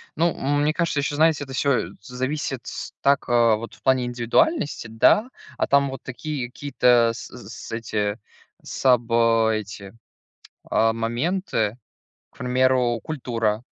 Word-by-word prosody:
Ну, 170 +1 +2
м 145 +2 0
мне 150 +1 +2
кажется, 170 -3 0
еще, 145 +1 -1
знаете, 155 -1 +3
это 135 -1 -9
всё, 140 +1 +1 0.2
э, - - -13
зависит 130 +2 -4 0.4
так, 140 -1 +3
э, 115 -2 +4
вот, 115 +2 -7
в - - -24
плане 130 -2 +3
индивидуальности, 120 - 0
да. 210 - +3 0.3
А - - 0
там 140 0 +3
вот 135 -2 -7
такие 130 0 -4
какие-то, 125 -3 +2
с 110 - -8
з - - -12
с - - -9
эти 110 -2 -2 0.4
саб 125 -3 +1
э, 115 -1 +3
эти, 100 0 -9 0.8
а, 115 0 +3
моменты- 120 - -1 0.6
к - - -23
примеру, 125 -1 +2
культура, 115 -7 -2
125 Hz, 150 wpm, -23 LUFS, 115-145 Hz, 0.8 s, э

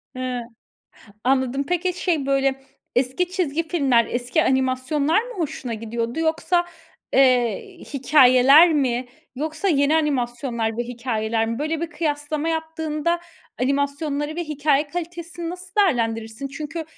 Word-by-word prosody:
He, 255 -1 -3 0.8
anladım. 260 +1 +1
Peki, 360 +1 0
şey, 340 -6 -1
böyle, 270 -1 +1 0.4
eski 265 +8 +1
çizgi 330 -3 -1
filmler, 265 -9 +3
eski 245 0 0
animasyonlar 265 - +1
mı - - -9
hoşuna 270 -8 -3
gidiyordu? 230 +4 -4
Yoksa, 325 +2 +1 0.5
eee, 250 -5 +2 0.2
hikâyeler 275 +4 +6
mi 255 -4 0 0.3
yoksa 310 +7 -2
yeni 290 0 +3
animasyonlar 240 -6 -1
ve 240 - 0
hikâyeler 230 -2 -2
mi? 230 +1 -3
Böyle 310 +2 -2
bir 335 0 -3
kıyaslama 300 0 -2
yaptığında 320 +1 -1 0.4
animasyonları 285 +3 -1
ve 345 - -2
hikâye 295 -1 +1
kalitesini 340 0 -5
nasıl 365 +1 -9
değerlendirirsin? 225 - 0
Çünkü 310 +3 -6
280 Hz, 120 wpm, -22 LUFS, 250-320 Hz, 0.8 s, hikâyeler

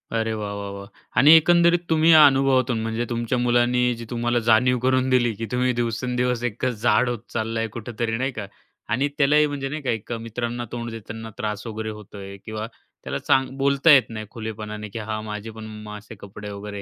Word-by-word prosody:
अरे 110 0 0
वाह! 105 -1 -4
वाह! 100 0 -5
वाह! 100 0 -8 0.3
आणि 145 +4 +8
एकंदरीत 170 +1 +4
तुम्ही 160 0 +4
या 155 -2 +9
अनुभवातून, 135 -4 +3
म्हणजे 115 +1 -2
तुमच्या 120 +1 -1
मुलांनी, 120 0 +2 0.2
जी - - -7
तुम्हाला 120 0 0
जाणीव 125 +3 +4
करून 130 0 +2
दिली, 120 -3 +3
की 115 +3 -4
तुम्ही 125 0 +1
दिवसेंदिवस 125 +1 -1
एक 115 +3 -5
अ, - - +3
जाड 120 +1 +2
होत 120 -2 -3
चाललाय 115 0 -1
कुठेतरी 115 0 -3
नाही 130 +3 -1
का. 110 -5 -6 0.4
आणि 130 +6 +1
त्यालाही 150 +1 +4
म्हणजे 140 -2 -4
नाही 155 +2 -5
का, 135 - -3
एक 115 0 -5 0.2
मित्रांना 120 +1 -4
तोंड 120 -1 -4
देतांना 110 0 -8
त्रास 105 -3 -4
वगैरे 110 0 -4
होतोय, 100 -1 -10
किंवा 110 0 -5 0.4
त्याला - - -3
सां 135 - +4
बोलता 140 +3 +4
येत 135 -3 +6
नाही 110 -1 -6
खुलेपणाने, 105 -2 -6
की 115 - -6
हां 110 0 -2
माझे 105 0 -6
पण 110 0 -9
मम्मा 105 -1 -8
असे 105 +2 -12
कपडे 105 +1 -9
वगैरे 100 0 -7
115 Hz, 195 wpm, -23 LUFS, 110-130 Hz, 0.4 s, या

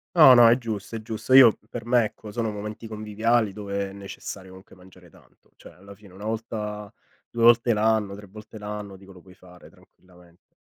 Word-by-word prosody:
No, 145 -6 +8
no, 120 -1 +7
è 120 +3 +4
giusto, 110 -2 -6
è 110 - -5
giusto. 115 +3 -4
Io, 130 -5 +8
per 115 -2 -7
me, 120 -1 +3
ecco, 105 0 -10
sono 115 0 -3
momenti 105 +2 -8
conviviali 110 +1 -1
dove 100 -1 -5
è - - -12
necessario, 100 -1 -9
comunque, 95 0 -16
mangiare 90 -1 -19
tanto. - - -25
Cioè, - - -16
alla 100 +2 -15
fine, 100 -3 -18
una 100 +3 -11
volta, 105 -2 -5 0.4
2 120 - -5
volte 120 0 +5
l'anno, 110 -2 0
3 105 -1 -13
volte 110 +2 -13
l'anno, 105 -1 -7
dico, 95 0 -16
lo 90 -2 -16
puoi 95 0 -18
fare 90 -1 -18
tranquillamente. 90 -1 -24
105 Hz, 195 wpm, -24 LUFS, 95-115 Hz, 0.4 s, No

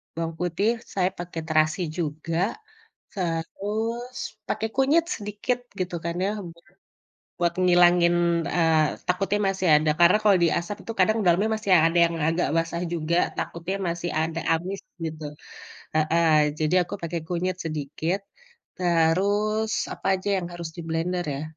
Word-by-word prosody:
bawang 165 0 -3
putih 180 +4 0 0.2
saya 185 -1 +2
pakai 175 -2 -5
terasi 155 +3 +2 0.2
juga, 165 0 -3 0.7
terus 210 +7 -3 0.3
pakai 220 - -1
kunyit 285 +5 +3
sedikit 210 +4 -2 0.2
gitu 180 -1 -2
kan 170 0 -2
ya 200 - 0 0.2
buat 170 +1 -21 0.7
buat 170 0 +2
ngilangin, 175 -1 +5 0.3
eee, 160 -3 +2
takutnya 195 +3 +1
masih 190 -1 -2
ada 155 +1 +3
karena 175 +3 +7
kalau 205 -3 +5
diasap 170 +4 0
itu 230 - -4
kadang 215 +4 +4
dalamnya 185 +6 +3
masih 210 -2 -4
yang 160 -2 +6
ada 170 +1 0
yang 165 - -4
agak 165 +2 +1
basah 165 +1 -1
juga, 165 +1 0 0.2
takutnya 170 +3 -3
masih 170 +1 -3
ada 160 +1 -2
amis 185 +4 -2 0.3
gitu. 155 -1 -5 0.7
Heeh, 160 +2 +2 0.3
jadi 155 +3 +1
aku - - -7
pakai 170 0 -3
kunyit 180 +1 -1
sedikit, 155 +4 -2 0.6
terus, 200 +6 +2 0.2
apa - - -7
aja 185 +2 -5
yang 175 - -5
harus 170 -2 -6
diblender 170 +2 -2
ya, 140 - -5
175 Hz, 140 wpm, -25 LUFS, 165-195 Hz, 0.7 s, karena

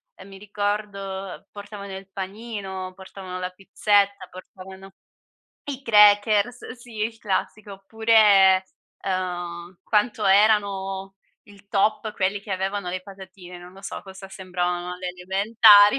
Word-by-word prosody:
ehm, 190 - -14
mi 195 -1 -12
ricordo 200 -2 -4
portavano 200 -1 -9
il 195 0 -13
panino, 195 -2 -6
portavano 190 -1 -9
la 180 0 -4
pizzetta, 200 +1 +1
portavano 190 +1 -12 0.7
i 275 -2 -5
crackers, 210 +1 +4
sì, 240 -2 -12
il 225 0 -5
classico, 210 0 -3
oppure, 195 -2 +4 0.4
uhm, 175 -1 -4
quanto 210 0 +1
erano 195 -1 +2 0.3
il 200 -1 -19
top 215 +2 +1
quelli 195 +1 -1
che 205 - -12
avevano 190 0 -2
le 185 +1 -3
patatine, 190 -2 -12
non 175 +1 -13
lo 190 - -14
so - - -6
cosa 190 0 -11
sembravano 180 -2 -3
alle 180 0 -5
elementari 205 +4 +5
195 Hz, 125 wpm, -24 LUFS, 190-210 Hz, 0.7 s, elementari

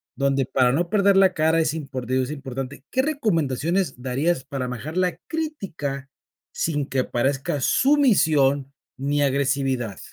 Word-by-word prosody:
donde 140 -1 +1
para 130 -1 +2
no 170 +5 0
perder 200 -1 +4
la 190 -1 +5
cara 160 +1 +2
es 155 - 0
import 140 -6 -5
digo 130 0 +2
es 125 - -5
importante, 135 -1 -6
¿qué 260 - +2
recomendaciones 170 - 0
darías 135 +4 0
para 135 -3 -4
manejar 135 +8 -6
la 180 -1 +1
crítica 175 - -4 0.4
sin 150 -4 -1
que 135 - -1
aparezca 135 +3 -1
sumisión 155 - +3 0.2
ni 145 +2 0
agresividad? 135 -5 0
140 Hz, 140 wpm, -23 LUFS, 135-175 Hz, 0.4 s, la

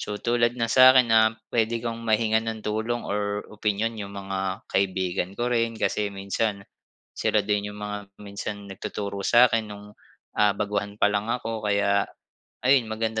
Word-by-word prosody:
So 105 - -4
tulad 120 0 +1
ng 115 - 0
sa 130 +1 +8
akin 125 - +6
na 110 - +7 0.3
pwede 115 0 +1
kong 115 0 -3
mahingan 110 0 +2
ng 110 -1 -4
tulong 110 +3 -2
or 100 0 -2
opinyon 105 +2 -1
yung 100 0 -7
mga 95 -1 -4
kaibigan 95 -1 0
ko 120 +1 0
rin 115 -1 +1
kasi 105 -1 0
minsan, 100 +1 -2 0.6
sila - - +2
din 105 0 0
yung - - -11
mga 105 -1 -5
minsan 100 0 -6
nagtuturo 100 +1 -5
sa'kin 120 -2 +4
nung, 105 0 -10 0.4
ah, 105 -1 +4
baguhan 105 0 -2
pa - - +4
lang 105 +2 -1
ako. 115 -2 -2
Kaya 100 -1 +2 0.6
ayun, 130 -3 +4
maganda 110 0 -2
105 Hz, 165 wpm, -25 LUFS, 100-115 Hz, 0.6 s, sa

